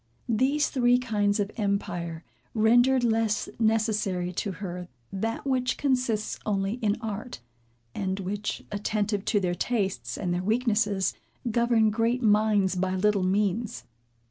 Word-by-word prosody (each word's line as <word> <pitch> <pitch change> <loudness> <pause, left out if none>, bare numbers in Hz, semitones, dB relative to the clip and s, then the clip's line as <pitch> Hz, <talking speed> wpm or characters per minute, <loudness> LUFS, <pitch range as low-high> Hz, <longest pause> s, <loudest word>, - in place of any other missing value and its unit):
These 265 +6 +2
three 245 -2 +4
kinds 210 -4 0
of 205 0 -1
empire 175 -5 -2 0.3
rendered 245 +4 +4
less 225 -2 +1
necessary 215 -5 +1
to 195 +2 -2
her 180 -2 -6 0.3
that 225 +6 -2
which 255 -2 0
consists 250 -6 0
only 200 +2 -1
in 210 -1 +1
art; 220 - -5 0.5
and 190 0 -2
which, 200 +2 -3
attentive 205 0 -1
to 210 - +2
their 180 -2 0
tastes 195 +1 -2
and 180 -3 -1
their 175 - -1
weaknesses, 210 - +1 0.4
govern 235 -1 +3
great 230 +3 0
minds 210 -3 +3
by 185 +1 0
little 205 +1 +2
means. 195 - 0
210 Hz, 130 wpm, -27 LUFS, 195-230 Hz, 0.5 s, three